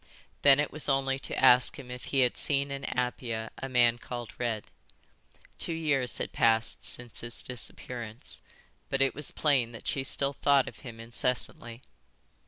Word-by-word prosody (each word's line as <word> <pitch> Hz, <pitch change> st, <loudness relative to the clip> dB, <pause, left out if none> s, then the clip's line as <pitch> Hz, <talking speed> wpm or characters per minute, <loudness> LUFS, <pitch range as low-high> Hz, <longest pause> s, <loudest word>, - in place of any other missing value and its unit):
Then 140 Hz, -1 st, +7 dB
it 150 Hz, -, 0 dB
was 150 Hz, 0 st, -1 dB
only 135 Hz, 0 st, +1 dB
to -, -, -4 dB
ask 125 Hz, -1 st, +5 dB
him 125 Hz, -3 st, -10 dB
if 125 Hz, 0 st, -8 dB
he 135 Hz, -, +1 dB
had 125 Hz, -1 st, +2 dB
seen 140 Hz, -1 st, +1 dB
in 140 Hz, 0 st, -5 dB
Apia 120 Hz, -2 st, -3 dB
a 135 Hz, -, -5 dB
man 120 Hz, -2 st, +3 dB
called 120 Hz, -2 st, -7 dB
Red. 115 Hz, -3 st, -2 dB, 1.0 s
Two 170 Hz, -, -2 dB
years 150 Hz, -6 st, 0 dB
had -, -, -4 dB
passed 115 Hz, 0 st, +2 dB
since 120 Hz, -1 st, +1 dB
his 120 Hz, 0 st, -4 dB
disappearance, 120 Hz, -2 st, -3 dB, 0.5 s
but 135 Hz, -, -1 dB
it 135 Hz, -, +1 dB
was 150 Hz, -, -5 dB
plain 130 Hz, -6 st, +1 dB
that 115 Hz, -, -8 dB
she 135 Hz, -, 0 dB
still 140 Hz, +1 st, +3 dB
thought 140 Hz, -1 st, +3 dB
of -, -, -9 dB
him 120 Hz, -4 st, -10 dB
incessantly. 120 Hz, 0 st, -3 dB
125 Hz, 170 wpm, -29 LUFS, 120-135 Hz, 1.0 s, Then